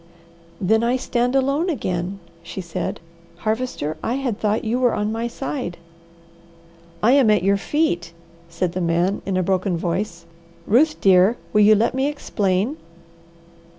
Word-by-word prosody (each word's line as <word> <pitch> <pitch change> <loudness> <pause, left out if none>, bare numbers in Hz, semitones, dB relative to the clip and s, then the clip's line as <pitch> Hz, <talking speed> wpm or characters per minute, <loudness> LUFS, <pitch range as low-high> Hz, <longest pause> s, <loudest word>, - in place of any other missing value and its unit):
"Then 220 +3 +2
I 240 +2 +2
stand 250 0 0
alone 275 +6 +1
again," 185 - -2 0.2
she 180 - -8
said. 170 -3 -4 0.4
"Harvester, 215 - -2
I 240 - -1
had 260 -6 -2
thought 215 0 0
you 230 +3 0
were 250 -2 +2
on 210 +1 -1
my 225 +1 -2
side." 250 -6 -5 1.3
"I 230 - +5
am 270 -4 +5
at 210 -4 +3
your 200 +1 +3
feet," 195 - -1 0.4
said 170 +1 -2
the 185 +1 -3
man 175 +3 +1
in 190 -2 0
a 185 - +1
broken 185 0 0
voice. 170 0 -3 0.4
"Ruth 305 +9 +3
dear, 195 +4 +5 0.2
will 210 - +5
you 215 +1 +7
let 220 +3 +1
me 265 +2 0
explain?" 215 -3 -1
210 Hz, 150 wpm, -22 LUFS, 185-250 Hz, 1.3 s, you